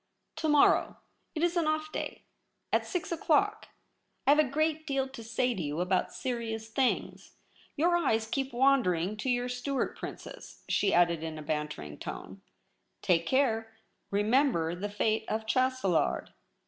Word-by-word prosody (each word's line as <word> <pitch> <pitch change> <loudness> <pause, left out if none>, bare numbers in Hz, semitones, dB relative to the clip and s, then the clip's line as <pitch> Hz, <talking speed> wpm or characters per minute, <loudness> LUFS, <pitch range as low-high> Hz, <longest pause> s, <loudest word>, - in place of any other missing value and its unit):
' - - -51
To 315 - 0
morrow; 295 -1 +4 0.4
it 315 - -1
is 345 0 +2
an 340 -2 +2
ofT 310 0 -1
day. - - -5 0.5
At - - +2
six 360 -2 -3
o'clock. 335 +5 +1 0.6
I - - +6
have 295 - +5
a - - +7
great 310 +2 0
deal 275 -2 0
to 265 -3 -10
say 240 +2 0
to 190 - -4
you 150 +1 -3
about 180 +1 +1
serious 225 -3 -4
things. 255 +2 -1 0.4
Your 345 +4 +3
eyes 225 -10 +1
keep 270 +4 -2
wan 270 +2 +4
dering 180 +1 -1
to 235 +5 -3
your 245 0 +1
Stuart 250 +2 -2
Princess,' - - -9
she 200 - +2
added 170 -2 +3
in 160 -1 -5
a 155 - -7
bantering 150 - -4
tone. 95 +1 -7 0.3
* - - -47
Take 170 -2 +2
care; 225 -5 +1 0.3
remember 205 - +2
the 195 +4 -4
fate 215 +2 0
of 220 0 -2
Chastelard. 255 - +1
235 Hz, 165 wpm, -30 LUFS, 185-275 Hz, 0.6 s, a